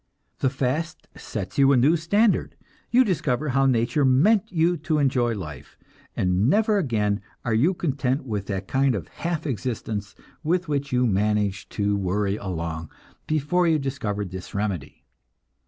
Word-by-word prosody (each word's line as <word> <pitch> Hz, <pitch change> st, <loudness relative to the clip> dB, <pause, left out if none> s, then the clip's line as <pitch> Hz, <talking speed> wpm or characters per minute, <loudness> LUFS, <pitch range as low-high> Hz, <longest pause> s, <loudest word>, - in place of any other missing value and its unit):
The 135 Hz, -, +2 dB
fast 140 Hz, +5 st, -2 dB
sets 105 Hz, +4 st, -5 dB
you 135 Hz, 0 st, +6 dB
a 135 Hz, -, +5 dB
new 140 Hz, +7 st, +4 dB
standard, 205 Hz, +7 st, +2 dB, 0.3 s
you 255 Hz, +2 st, +5 dB
discover 150 Hz, -, 0 dB
how 135 Hz, +1 st, +3 dB
nature 120 Hz, +3 st, +2 dB
meant 190 Hz, -, +4 dB
you 170 Hz, 0 st, +2 dB
to 155 Hz, 0 st, -1 dB
enjoy 125 Hz, -5 st, +2 dB
life, 75 Hz, -7 st, -8 dB, 0.4 s
and 90 Hz, +5 st, +2 dB
never 215 Hz, +2 st, +3 dB
again 105 Hz, -, 0 dB, 0.2 s
are 120 Hz, -, 0 dB
you 150 Hz, +12 st, +3 dB
content 135 Hz, -4 st, -1 dB
with 105 Hz, -5 st, -3 dB
that 95 Hz, -1 st, -3 dB
kind 135 Hz, -2 st, +2 dB
of 90 Hz, -7 st, -5 dB
half 170 Hz, -2 st, -3 dB
existence 110 Hz, -5 st, -3 dB, 0.3 s
with 175 Hz, +3 st, 0 dB
which 145 Hz, -1 st, -2 dB
you 125 Hz, 0 st, +2 dB
managed 105 Hz, -2 st, 0 dB
to 100 Hz, -1 st, +1 dB
worry 100 Hz, +1 st, 0 dB
along 85 Hz, -5 st, -4 dB, 0.4 s
before 155 Hz, +4 st, +1 dB
you 160 Hz, -1 st, +4 dB
discovered 105 Hz, -, -3 dB
this 95 Hz, +1 st, -8 dB
remedy. 95 Hz, -9 st, -3 dB
130 Hz, 155 wpm, -24 LUFS, 105-155 Hz, 0.4 s, you